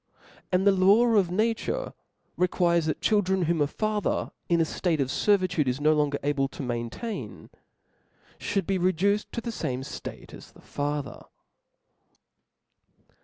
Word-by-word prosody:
And 185 +1 +2
the 200 - +7
law 195 +5 +5
of 205 -6 +3
nature 225 - -1 0.4
requires, 170 -2 +2
that 155 - -2
children, 190 -3 +2
whom 165 -1 +1
a 145 - +3
father 215 +6 -1 0.2
in 170 - +4
the 165 - +3
ftate 165 +1 -1
6f 135 -3 -1
fervitude 180 -6 -1
is 125 +2 0
no 155 +1 +4
longer 150 -2 +1
able 140 -1 +1
to 140 - -8
maintain, 120 - -5 0.9
Ihould 195 -3 -1
be 190 +1 0
reduced 185 +4 +1
to 235 - -3
the 235 - -4
fame 130 - -3
ftate - - -8
as* - - -12
the - - -18
father. 145 -2 -4
175 Hz, 145 wpm, -27 LUFS, 145-200 Hz, 0.9 s, the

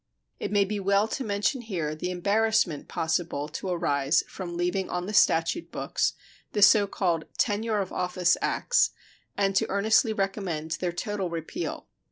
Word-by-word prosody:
It - - -3
may 205 -1 +3
be 205 +1 -3
well 200 +2 +2
to 270 - -3
mention 210 +5 0
here 175 -10 -3
the 155 +4 -4
embarrassment 200 -2 +1
possible 160 -2 -1
to 185 +4 -5
arise 145 -4 +1
from 175 -2 -6
leaving 180 +2 -1
on 180 0 -2
the 210 - -5
statute 205 - +3
books - - -1 0.4
the 205 - +3
so 200 +1 +7
called 170 -5 -1
"tenure 215 0 +1
of 190 - -5
office 180 0 +2
acts," 485 - +2 0.5
and 195 -1 +1
to - - +2
earnestly 220 +3 +3
recommend 195 -6 -2
their 180 -1 -1
total 195 0 -3
repeal. 170 - -5
195 Hz, 160 wpm, -27 LUFS, 175-210 Hz, 0.5 s, so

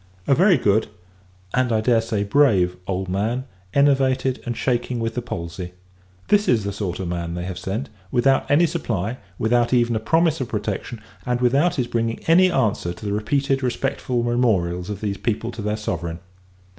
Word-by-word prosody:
A - - +4
very 180 +5 +5
good 105 +2 +2 0.7
and, 125 -1 +1
I 110 - +2
dare 115 +1 +3
say, 110 -2 -1
brave 100 -6 +3
old 95 0 -2
man; 110 +8 -1 0.3
enervated, 135 -1 +2
and 120 -1 -2
shaking 125 -1 -1
with 115 0 -2
the 125 - -2
palsy. 90 -5 -6 0.6
This 205 0 +4
is 115 -4 +3
the 100 0 -3
sort 95 -3 -4
of 95 - -3
man 85 -1 -3
that 90 - -3
they - - -4
have 90 -1 -5
sent; 105 +9 -4 0.2
without 135 +4 +2
any 150 +4 +5
supply, 120 - -2 0.2
without 120 +2 +2
even 120 -1 +2
a - - +1
promise 160 +5 +2
of 125 - -3
protection, 105 +2 -4 0.2
and 125 0 -1
without 135 +8 +3
his 125 - 0
bringing 115 -1 -1
any 180 +3 +5
answer 110 - 0
to 90 - -11
the 100 - -1
repeated 135 +6 0
respectful 125 -1 -1
memorials 100 -7 +1
of 100 -2 -5
these 100 -2 -2
people 115 +1 -2
to 115 - -7
their 105 +1 -1
Sovereign. 85 -5 -3
115 Hz, 185 wpm, -22 LUFS, 100-130 Hz, 0.7 s, very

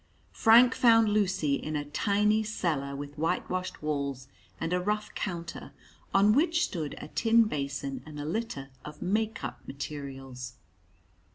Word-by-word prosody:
Frank 240 +3 +6
found 225 -2 +5
Lucy 190 -8 +1
in 155 +2 -2
a 145 -1 -2
tiny 210 +8 +2
cellar 160 -10 -2
with 145 +1 -7
whitewashed 180 +2 -2
walls 140 -3 -2 0.3
and 165 - -2
a 180 - +1
rough 210 +3 -2
counter, 170 -3 -5 0.4
on 200 +2 +5
which 335 +5 +3
stood 155 - -3
a - - -8
tin 230 +5 +4
basin 140 - -3
and 150 0 -9
a 145 - -4
litter 155 -7 -3
of 150 0 -8
"make 215 +2 -1
up" 120 -1 -5
materials. 135 -3 -7
165 Hz, 145 wpm, -29 LUFS, 140-210 Hz, 0.4 s, Frank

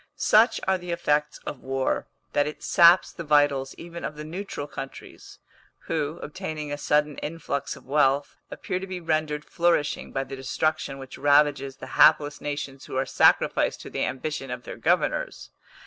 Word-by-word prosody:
Such 225 +3 +4
are 190 -1 +2
the 175 0 -9
effects 150 -3 0
of 145 - -5
war, 135 0 -1 0.3
that 145 0 +2
it 150 - -7
saps 170 +2 +6
the 170 - -7
vitals 145 -3 +2
even 170 0 -9
of 150 - -4
the 150 - -7
neutral 170 -1 -5
countries, 135 -2 -9 0.5
who, 155 0 -2
obtaining 150 0 -5
a 145 - -2
sudden 150 0 +1
influx 150 -3 -4
of - - -15
wealth, 140 0 +2
appear 180 - -4
to 190 - -7
be 185 -1 -5
rendered 155 -2 -1
flourishing 170 -4 0
by 135 - -1
the 135 0 -7
destruction 135 +2 -1
which 135 -1 -10
ravages 145 -1 +3
the - - -9 0.2
hapless 150 -1 +5
nations 145 -2 -5
who - - -7
are 135 - +1
sacrificed - - +3
to - - -10
the - - -1
ambition 135 +1 -3
of 125 0 -5
their - - -7
governors. - - 0
150 Hz, 170 wpm, -25 LUFS, 140-160 Hz, 0.5 s, saps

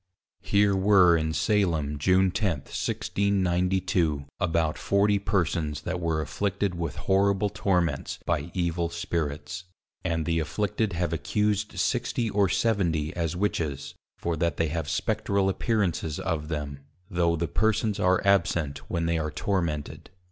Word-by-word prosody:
Here 100 -1 +3
were 95 -3 +5
in 80 -1 0
Salem, 80 -3 +1
June 95 +4 +3
10, 100 0 +1
1692, 90 -6 0
about 80 -4 +1
40 100 +1 +2
persons 80 -6 -1
that 90 +2 -3
were 80 -2 0
afflicted 100 +6 -1
with 85 -4 -4
horrible 100 +1 +2
torments 90 -8 0
by 80 -1 -1
Evil 85 -1 0
Spirits, 85 0 -3 0.4
and 80 -1 -1
the 85 -1 +1
afflicted 100 +6 -1
have 85 -1 -1
accused 105 +7 -1
60 115 -3 0
or 100 -1 +2
70 85 -9 0
as 85 -1 -1
Witches, 80 -7 -2 0.2
for 85 -1 -2
that 85 +2 0
they 80 -2 +1
have 80 -1 -3
Spectral 100 -1 0
appearances 95 -7 -1
of 80 -4 -2
them, 75 -3 -4 0.3
tho 85 -2 +2
the 85 +1 -1
Persons 110 +4 +1
are 90 +1 +2
absent 85 -7 +2
when 85 -2 -1
they 85 0 +1
are 75 -1 -1
tormented. 75 -2 -2
85 Hz, 135 wpm, -27 LUFS, 80-100 Hz, 0.4 s, were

